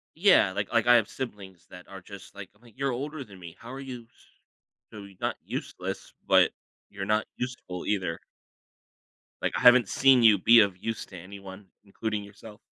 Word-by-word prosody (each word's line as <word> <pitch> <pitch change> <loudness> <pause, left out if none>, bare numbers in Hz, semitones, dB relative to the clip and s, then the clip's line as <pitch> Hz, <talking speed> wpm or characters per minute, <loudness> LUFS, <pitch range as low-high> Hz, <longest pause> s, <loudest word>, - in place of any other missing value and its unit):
Yeah, 170 - +5
like 100 0 -3
like 115 0 +2
I 120 - +7
have 110 -3 +2
siblings 95 -8 -8
that 90 0 -13
are 95 -1 -11
just, 100 +1 -12
like 100 -2 -9
I'm 105 - -29
like, 120 +1 -20
"You're 135 -1 -1
older 140 +3 -5
than 100 -5 -15
me, 85 -2 -11
how 120 +2 -10
are 135 - -7
you, 125 -3 -8
s - - -26 0.7
so, 105 -2 -10
you're 100 -2 -15
not - - -2
useless, - - -6
but - - +5 0.4
you're 100 -1 -6
not 105 +1 +1
useful 120 -8 -6
either." 95 -5 -2 1.2
Like, - - -1
I - - -4
haven't 125 -3 +7
seen 130 -3 +4
you 105 -3 +7
be 115 +3 +7
of 100 -3 0
use 115 +3 -5
to 95 - -11
anyone, 95 +2 -11 0.2
including 105 +1 -4
yourself. 105 +1 -14
105 Hz, 195 wpm, -27 LUFS, 95-120 Hz, 1.2 s, I